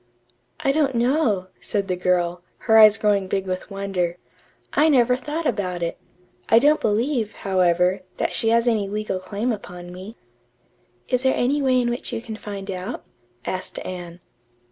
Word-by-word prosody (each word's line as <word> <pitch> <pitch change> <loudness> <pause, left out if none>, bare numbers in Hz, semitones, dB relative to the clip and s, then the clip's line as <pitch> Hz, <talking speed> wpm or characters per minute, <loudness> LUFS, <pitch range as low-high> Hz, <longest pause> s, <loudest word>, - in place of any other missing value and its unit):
"I 275 - +2
don't 275 -3 +1
know," 235 -6 +1
said 200 -2 -2
the 185 - 0
girl, 175 -1 0 0.2
her 220 -1 +6
eyes 215 0 +8
growing 205 -3 +1
big 195 0 -1
with 185 +2 -4
wonder. 195 -3 -2 0.6
"I 310 +2 +4
never 250 -3 +4
thought 300 +6 -4
about 185 - -1
it. 170 - -3 0.5
I 225 - +7
don't 295 +5 +4
believe, 225 +1 0
however, 180 0 +2 0.2
that - - -1
she 225 - +2
has 230 +1 +3
any 215 -4 +1
legal 210 -2 -2
claim 205 +6 -2
upon 180 -4 -7
me." 190 +5 -9 0.9
"Is 250 - +1
there 265 0 +2
any 280 +4 +1
way 260 -2 +3
in 240 -1 +1
which 240 - -4
you - - -2
can 225 -1 -7
find 200 -2 -6
out?" 185 +5 -5 0.4
asked 185 - -4
Anne. 175 -1 -7
210 Hz, 165 wpm, -23 LUFS, 185-245 Hz, 0.9 s, eyes